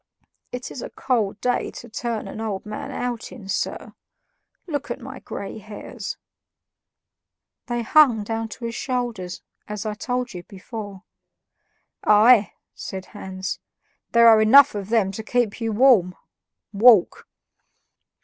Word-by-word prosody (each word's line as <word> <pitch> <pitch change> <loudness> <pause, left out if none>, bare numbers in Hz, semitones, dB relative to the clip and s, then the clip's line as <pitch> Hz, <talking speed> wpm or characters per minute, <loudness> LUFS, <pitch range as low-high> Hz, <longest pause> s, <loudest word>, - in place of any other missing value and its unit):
"It 250 0 -6
is 255 - -7
a - - -6
cold 215 -6 -1
day 250 0 0
to - - -10
turn 230 -2 -4
an 215 - -7
old 210 -3 -4
man 210 0 -6
out 245 -2 -4
in, 210 -6 -11
sir; 195 - -3 0.7
look 290 -4 -4
at - - -4
my 260 +1 -9
gray 200 +2 -7
hairs." 210 0 -7 1.5
They 240 -1 -2
hung 245 -4 +5
down 225 +1 -3
to 235 +2 -8
his 230 - -3
shoulders, 235 -9 -3 0.2
as 210 0 -5
I 215 - -2
told 250 +2 -3
you 180 - -6
before. 200 +1 -9 1.0
"Aye!" 215 +1 +6 0.2
said 190 -1 -7
Hans; 190 -2 -5 0.5
"there 235 0 +6
are 220 -1 +7
enough 275 +6 +7
of 205 -1 -5
them 220 -4 +2
to 200 - -6
keep 235 0 -1
you 225 -1 -1
warm. 210 -6 +4 0.6
Walk!" 215 -2 +5
220 Hz, 140 wpm, -23 LUFS, 205-245 Hz, 1.5 s, are